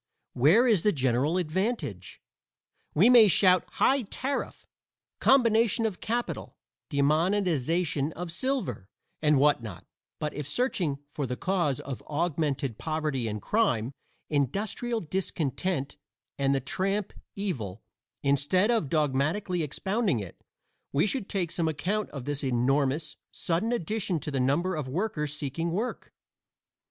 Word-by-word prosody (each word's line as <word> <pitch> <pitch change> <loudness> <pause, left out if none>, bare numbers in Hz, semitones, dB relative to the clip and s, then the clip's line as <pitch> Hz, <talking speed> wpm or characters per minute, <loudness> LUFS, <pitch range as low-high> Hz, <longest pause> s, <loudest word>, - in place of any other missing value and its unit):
Where 170 - +5
is 215 -8 +4
the 210 - +3
general 135 +3 +1
advantage? 170 - -2 0.8
We 185 +9 +6
may 240 -3 +8
shout 185 0 +4
"high 275 +1 +3
tariff," 260 +5 -4 0.5
"combination 230 -3 +4
of 210 -5 -3
capital," 240 +2 -3 0.3
"demonetization 160 0 +1
of 175 -1 -5
silver," 170 - -2 0.3
and 150 -2 +4
what 145 -1 +4
not, 105 -7 -8 0.3
but 150 - -3
if 145 -1 -5
searching 170 - 0 0.2
for 145 -3 -2
the 125 +1 -3
cause 175 -8 0
of 135 -3 -6
augmented 145 -6 -1
poverty 155 -6 -1
and 105 -1 -3
crime, 135 - +1 0.4
"industrial 205 - -1
discontent" 160 -3 -2 0.4
and 140 0 +1
the - - +2
tramp 195 +9 -2 0.2
evil, 135 - -4 0.4
instead 145 - +3
of 220 - +1
dogmatically 155 +6 0
expounding 190 - 0
it, 95 -5 -9 0.5
we 145 +5 +2
should 215 -1 -2
take 180 -5 -1
some 170 -1 0
account 185 +8 -1
of 135 -4 -7
this 145 -1 -2
enormous, 135 +4 +1
sudden 175 +7 -1
addition 205 -5 -1
to 150 - -4
the 135 - -1
number 145 +9 +1
of 150 -4 -3
workers 150 -1 -2
seeking 155 +3 -3
work. 210 +9 -3
160 Hz, 130 wpm, -28 LUFS, 140-200 Hz, 0.8 s, may